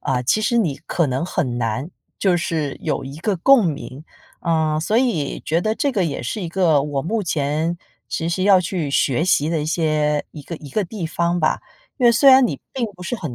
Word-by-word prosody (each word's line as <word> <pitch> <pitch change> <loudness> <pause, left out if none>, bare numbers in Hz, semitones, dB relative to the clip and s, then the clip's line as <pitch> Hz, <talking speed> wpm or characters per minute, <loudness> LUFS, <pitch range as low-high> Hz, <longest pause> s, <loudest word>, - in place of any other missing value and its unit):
啊， 130 -3 -1
其 130 - +2
实 215 +3 +1
你 165 -11 0
可 170 - +1
能 130 +4 -1
很 130 -10 -2
难， 120 +7 -2 0.3
就 185 -3 +2
是 155 -4 -2
有 - - -2
一 135 +2 -8
个 195 +3 -1
共 240 +3 +5
鸣。 145 -3 -5 0.4
呃， 160 -2 +1
所 210 +7 0
以 225 - 0
觉 165 +2 +1
得 215 +4 0
这 280 +3 0
个 200 -6 +1
也 155 -4 -3
是 120 - -4
一 175 - -4
个 165 -5 +2
我 140 -1 -2
目 215 +7 -1
前 155 0 -1 0.3
其 165 - -2
实 185 +2 -1
要 195 -2 +6
去 170 -4 -3
学 140 +1 +1
习 155 -4 +2
的 165 -2 0
一 150 - -3
些 155 -2 0
一 155 - -9
个 165 +4 -7
一 150 - -11
个 210 +8 0
地 185 -1 -5
方 170 +2 0
吧， 155 - +1 0.4
因 250 - 0
为 235 - +7
虽 275 +5 +5
然 260 -1 +7
你 - - -5
并 255 - -1
不 180 - -12
是 180 +8 -3
很 160 - -6
165 Hz, 245 characters per minute, -21 LUFS, 150-195 Hz, 0.4 s, 为